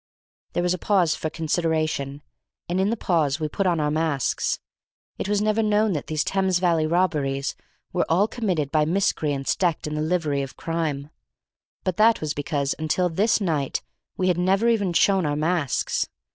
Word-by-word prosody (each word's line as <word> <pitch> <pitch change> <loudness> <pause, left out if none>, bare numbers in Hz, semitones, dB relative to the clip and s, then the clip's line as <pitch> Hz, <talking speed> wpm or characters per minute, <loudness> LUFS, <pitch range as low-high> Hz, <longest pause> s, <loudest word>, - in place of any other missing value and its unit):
There 175 - 0
was 180 0 +2
a 180 - -4
pause 185 -5 +2
for 155 - -3
consideration, 155 -3 -1 0.4
and 180 +2 0
in 195 - +2
the 230 - -1
pause 155 -7 +1
we 155 - -1
put 190 +5 -1
on 170 -2 +2
our 150 -1 +1
masks. 155 -4 0 0.6
It - - -3
was 205 0 +1
never 215 +1 +2
known 210 -1 +2
that 150 - -4
these 155 -1 0
Thames 190 -2 +1
Valley 170 -3 +2
robberies 150 -6 0 0.4
were - - +1
all 185 +6 +3
committed 180 - -1
by 155 -1 +3
miscreants 150 -5 0
decked 175 -4 0
in 150 - -4
the 150 - -1
livery 155 -4 0
of 135 -1 -7
crime, 155 -3 -3 0.7
but 185 -2 -1
that 225 +1 +5
was 155 -1 -2
because 145 -2 -1
until 170 +3 +1
this 210 +8 +2
night 155 -9 -1 0.3
we 185 - +1
had 180 -1 +2
never 195 +5 +2
even 205 -6 +1
shown 190 +2 +3
our 145 -2 0
masks. 155 -2 0
165 Hz, 180 wpm, -24 LUFS, 150-190 Hz, 0.7 s, that